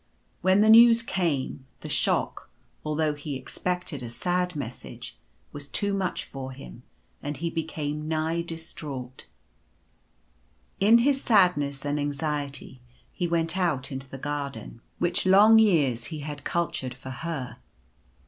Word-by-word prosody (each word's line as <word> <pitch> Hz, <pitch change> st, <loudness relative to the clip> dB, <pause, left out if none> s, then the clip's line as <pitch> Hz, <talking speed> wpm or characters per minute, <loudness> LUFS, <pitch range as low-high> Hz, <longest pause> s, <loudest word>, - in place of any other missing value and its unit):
When 190 Hz, +2 st, +4 dB
the 215 Hz, -, +5 dB
news 230 Hz, 0 st, +8 dB
came, 145 Hz, -, -2 dB
the -, -, -7 dB
shock, -, -, 0 dB, 0.3 s
although 155 Hz, 0 st, 0 dB
he 145 Hz, -1 st, -6 dB
expected 180 Hz, +3 st, -3 dB
a 120 Hz, -, -6 dB
sad 180 Hz, +7 st, -1 dB
message, 115 Hz, -, -7 dB, 0.4 s
was 145 Hz, -1 st, -8 dB
too 205 Hz, -1 st, -1 dB
much 190 Hz, -2 st, -2 dB
for 130 Hz, -1 st, -7 dB
him, 60 Hz, -, -11 dB, 0.4 s
and 145 Hz, 0 st, -4 dB
he 165 Hz, +3 st, -3 dB
became 155 Hz, -2 st, -3 dB
nigh 160 Hz, +1 st, 0 dB
distraught. 150 Hz, -6 st, -7 dB, 1.5 s
In 210 Hz, +4 st, +7 dB
his 270 Hz, +3 st, +2 dB
sadness 145 Hz, -, +3 dB
and 145 Hz, +1 st, 0 dB
anxiety 145 Hz, -2 st, -3 dB, 0.3 s
he 180 Hz, -, -1 dB
went 165 Hz, 0 st, 0 dB
out 150 Hz, -7 st, 0 dB
into 135 Hz, 0 st, -6 dB
the 135 Hz, -, -7 dB
gar 145 Hz, +1 st, -2 dB
I -, -, -6 dB
34 115 Hz, -, -9 dB
Early -, -, -10 dB
Love. -, -, -10 dB
den 115 Hz, -, -18 dB, 0.2 s
which 175 Hz, +3 st, 0 dB
long 210 Hz, +4 st, +7 dB
years 145 Hz, -, +3 dB
he 155 Hz, -3 st, -6 dB
had 145 Hz, -1 st, -6 dB
cultured 145 Hz, -8 st, -2 dB
for 130 Hz, 0 st, -9 dB
Her. 130 Hz, 0 st, -5 dB
150 Hz, 150 wpm, -26 LUFS, 135-180 Hz, 1.5 s, news